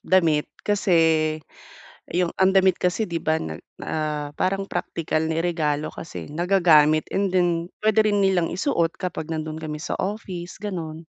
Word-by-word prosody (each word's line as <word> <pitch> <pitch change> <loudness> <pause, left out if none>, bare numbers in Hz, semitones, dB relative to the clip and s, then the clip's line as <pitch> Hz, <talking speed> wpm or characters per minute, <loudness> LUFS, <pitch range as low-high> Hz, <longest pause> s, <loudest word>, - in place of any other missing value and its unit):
damit. 165 -5 +2 0.2
Kasi, 205 -1 0 1.2
yung 175 0 0
ang 190 0 +4
damit 190 -1 +3
kasi 180 +5 +1
'di 170 -1 -4
ba, 160 0 +1
nag 80 - -6 0.2
ah, 150 -2 -3
parang 195 +1 -1
praktikal 160 -4 -2
niregalo 160 -2 0
kasi 165 - -7
nagagamit. 155 -2 +4
And 195 0 +1
then 175 -1 +1
puwede 215 0 +3
rin 205 - +2
nilang 180 -3 +1
isuot 175 - 0
kapag 170 -3 -4
nandoon 155 0 -4
kami 150 -1 -4
sa 155 - -4
office, 185 -3 -5
gano'n. 165 -5 -5
170 Hz, 145 wpm, -24 LUFS, 155-190 Hz, 1.2 s, ang